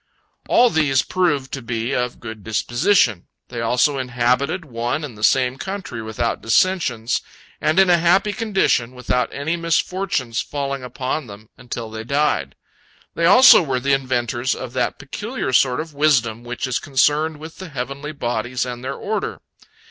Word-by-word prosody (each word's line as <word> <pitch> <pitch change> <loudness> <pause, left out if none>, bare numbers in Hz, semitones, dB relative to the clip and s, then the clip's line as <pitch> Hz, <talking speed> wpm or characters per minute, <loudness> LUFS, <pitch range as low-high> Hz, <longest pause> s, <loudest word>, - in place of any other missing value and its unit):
All 245 0 +5
these 145 -4 +2
proved 145 -8 0
to 135 - -4
be 115 +2 -3
of 125 -1 -2
good 110 -2 -8
disposition. 120 - +1 0.2
They 120 -2 -5
also 125 +5 +2
inhabited 130 +7 0
one 120 +3 -3
and 135 -6 -7
the 105 - -10
same 130 +2 +3
country 190 - -5
without 110 +2 -2
dissensions, 120 -3 +1 0.4
and 155 +3 +1
in 190 - +6
a 175 -1 +4
happy 190 +5 +3
condition, 140 - 0
without 125 0 -1
any 155 +4 -2
misfortune's 165 -6 -1
falling 140 -1 -4
upon 125 +3 -4
them, 105 +1 -12
until 120 -2 -7
they 110 0 -6
died. 140 - 0 0.6
They 165 - 0
also 250 +5 +8
were 135 -6 -1
the 140 +2 +1
inventors 130 -1 0
of 125 -2 -7
that 125 -1 -1
peculiar 205 - -5
sort 125 0 +3
of 155 -1 -6
wisdom 125 -6 +2
which 120 +2 -4
is 130 -2 -1
concerned 150 +3 +1
with 160 +2 -10
the 190 -2 -8
heavenly 140 +2 -5
bodies 120 -2 -2
and 125 0 -6
their 135 +1 -3
order. 215 +1 -3
130 Hz, 160 wpm, -21 LUFS, 120-155 Hz, 0.6 s, also